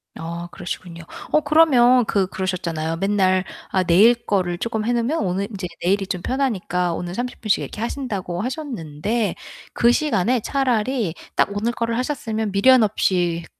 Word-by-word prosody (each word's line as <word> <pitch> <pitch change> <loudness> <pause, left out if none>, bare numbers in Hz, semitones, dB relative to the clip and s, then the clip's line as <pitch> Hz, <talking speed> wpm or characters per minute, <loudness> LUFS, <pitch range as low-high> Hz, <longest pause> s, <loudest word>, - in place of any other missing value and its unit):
아 170 +1 -6
그러시군요. 175 -2 -7 0.3
어 305 - +5
그러면 265 -5 +5
그 195 -4 +1
그러셨잖아요. 170 -4 -3
맨날 190 -1 +2 0.2
아 185 - +1
내일 190 +7 +6
거를 180 -3 0
조금 220 +2 -2
해 240 - +1
놓으면 245 +7 0
오늘 195 0 -1
인제 190 -4 -5 0.2
내일이 195 +3 +2
좀 180 -2 -4
편하니까 180 -9 -1
오늘 175 +2 -5
30 250 +1 -4
분씩 215 -3 +1
이렇게 - - -7
하신다고 205 -8 -3
하셨는데 225 - -3 0.4
그 235 - +4
시간에 250 -5 +1
차라리 250 - 0 0.2
딱 - - +3
오늘 220 +3 0
거를 230 -1 -2
하셨으면 225 -5 -2
미련 245 +5 +5
없이 175 -5 0
205 Hz, 340 characters per minute, -21 LUFS, 180-240 Hz, 0.4 s, 내일